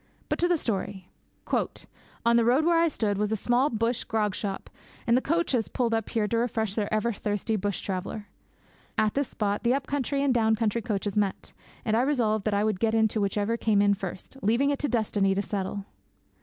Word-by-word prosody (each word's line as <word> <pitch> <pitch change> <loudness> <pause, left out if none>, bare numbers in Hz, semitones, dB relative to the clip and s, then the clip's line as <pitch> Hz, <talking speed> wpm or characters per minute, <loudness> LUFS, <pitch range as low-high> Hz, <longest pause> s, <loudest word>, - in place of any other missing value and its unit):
But - - -1
to 350 - +3
the 350 -1 +3
story. 195 - -4 1.1
'On 235 0 +5
the 235 - +5
road 255 +7 +3
where 340 -1 +4
I 335 - +4
stood 210 -9 -1
was 210 0 0
a - - +2
small 245 +6 +2
bush 230 0 -1
grog 210 -3 0
shop, 195 0 -4 0.4
and 235 - +4
the 255 - +3
coaches 290 -8 +1
pulled 240 -3 -1
up 225 -2 -1
here 220 -2 0
to 230 - 0
refresh 225 -3 0
the 210 -1 -2
ever 215 +2 +1
thirsty 210 +2 -2
bush 205 -1 -2
traveller. 195 +2 -4 0.7
At 215 -1 +2
this 280 -1 0
spot 205 -1 -1
the 245 +2 +3
up 275 -1 -2
country 280 0 -1
and 275 -2 +3
down 220 -2 +3
country 225 +1 0
coaches 205 -3 -2
met, 205 -2 -1 0.3
and 220 - +2
I 230 - +4
resolved 230 -7 +1
that 215 - +1
I 200 - +2
would 215 -3 0
get 225 -1 +2
into 220 -1 +2
whichever 205 +3 0
came 215 -3 +2
in 205 0 +4
first, 195 +5 -7
leaving 245 +7 +2
it 280 - -1
to 290 - -1
destiny 205 -4 +1
to 200 - +1
settle. 200 -1 -3
220 Hz, 210 wpm, -27 LUFS, 205-245 Hz, 1.1 s, On